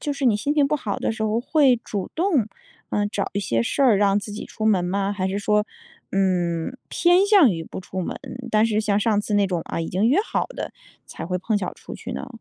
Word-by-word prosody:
就 290 - -2
是 280 -1 -4
你 220 -4 +4
心 285 +7 -1
情 290 -2 +4
不 300 - 0
好 215 -8 -3
的 - - -1
时 220 - -5
候， 220 +2 +1
会 270 -2 +4
主 200 -3 -4
动， 320 - +2 0.4
呃， 205 0 +1
找 205 -1 -2
一 200 - -1
些 115 - 0
事 200 - -2
儿 245 -7 +5
让 200 0 +3
自 205 0 -6
己 210 - -6
出 220 - -4
门 190 -5 +3
吗？ 195 +2 -1
还 190 -2 -1
是 195 - -2
说， 210 +1 +2 0.5
嗯， 180 +2 0
偏 355 +3 +4
向 400 - +6
于 165 -1 -4
不 - - -8
出 190 0 -5
门， 180 - -4 0.3
但 215 0 +4
是 215 -1 +1
像 205 -1 +1
上 210 -1 +2
次 210 0 -2
那 200 -1 +3
种， 180 -3 -1
啊， - - -3
已 165 - -3
经 200 +6 +1
约 300 +9 +4
好 - - -1
的 - - -6 0.3
才 - - -7
会 180 +2 -2
碰 210 +3 0
巧 185 -3 -2
儿 - - -4
出 - - -10
去 - - -8
呢？ - - -5
210 Hz, 270 characters per minute, -23 LUFS, 190-245 Hz, 0.5 s, 向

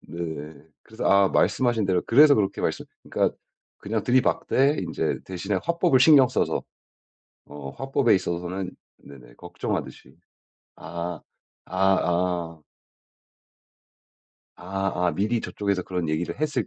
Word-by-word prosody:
네. 80 -2 -7 0.3
그래서 110 +1 -8
아 100 -1 +5
말씀하신 110 +3 +1
대로 95 -2 +1
그래서 145 +4 +7
그렇게 100 -4 -1
말씀 - - -2 0.2
그러니까 - - 0 0.4
그냥 110 +1 -3
들이박되 130 +3 +2
인제 80 -2 -2
대신에 95 +2 -3
화법을 170 -4 +2
신경 135 -3 +7
써서. - - -1 0.8
어 70 -1 -8
화법에 135 - +1
있어서는 90 0 -3 0.3
네네 60 -4 -15
걱정하듯이. - - -6 0.6
아 85 +1 -6 0.5
아 95 +1 +2 0.2
어. 85 -3 -2 1.9
아 95 -1 -2
아 - - +2
미리 110 +4 0
저 - - -6
쪽에서 100 -3 -1
그런 90 -2 -3
얘기를 80 +8 -2
했을 155 -2 -1
95 Hz, 265 characters per minute, -25 LUFS, 85-120 Hz, 1.9 s, 그래서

